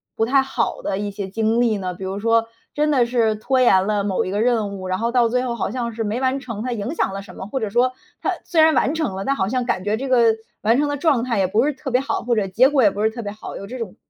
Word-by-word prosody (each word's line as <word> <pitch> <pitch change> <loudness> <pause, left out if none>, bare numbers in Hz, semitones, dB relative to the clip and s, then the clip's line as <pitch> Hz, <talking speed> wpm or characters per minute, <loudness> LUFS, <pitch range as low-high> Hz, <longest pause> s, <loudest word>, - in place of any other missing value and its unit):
不 225 - +1
太 270 +3 +4
好 270 0 -2
的 190 - -2
一 205 0 -3
些 200 -1 -6
经 225 +3 +1
历 225 -3 +2
呢？ 185 -2 -4
比 190 - -9
如 190 +2 -4
说， 230 +1 +2 0.3
真 300 0 +1
的 250 -4 +3
是 230 -3 +1
拖 255 +4 0
延 190 -6 +5
了 205 -2 0
某 195 -2 0
一 185 - -4
个 205 +2 0
任 220 -5 0
务， 185 0 -6
然 185 - -1
后 230 +1 0
到 240 -2 +3
最 250 +1 0
后 240 -2 -2
好 205 - -2
像 235 -2 -3
是 225 0 -3
没 215 +4 -2
完 265 +1 0
成， 230 -5 -6
它 250 0 -2
影 215 +7 -4
响 195 - -1
了 195 - -5
什 200 - -13
么？ - - -7
或 260 +3 -3
者 215 - -1
说 250 +4 +2 0.3
它 - - 0
虽 325 -3 +2
然 315 0 +6
完 285 - +2
成 315 -12 -2
了， 195 - -4
但 275 +4 0
好 190 - 0
像 250 +2 -1
感 185 -5 -2
觉 210 +1 +1
这 265 +3 -4
个 230 -3 +4 0.3
完 225 +3 +3
成 290 0 +1
的 290 - -2
状 280 -6 +2
态 235 -4 -1
也 185 - +2
不 220 +7 +2
是 300 - +1
特 270 -1 -7
别 250 +2 +3
好， 275 - -2
或 240 -1 +1
者 200 -3 0
结 245 +8 +5
果 275 -4 +3
也 205 - +5
不 205 - -4
是 220 - +4
特 235 +1 -7
别 205 - -4
好， 215 +1 -9
有 200 - -7
这 255 +1 -7
种 215 -5 -6
230 Hz, 340 characters per minute, -21 LUFS, 205-255 Hz, 0.3 s, 然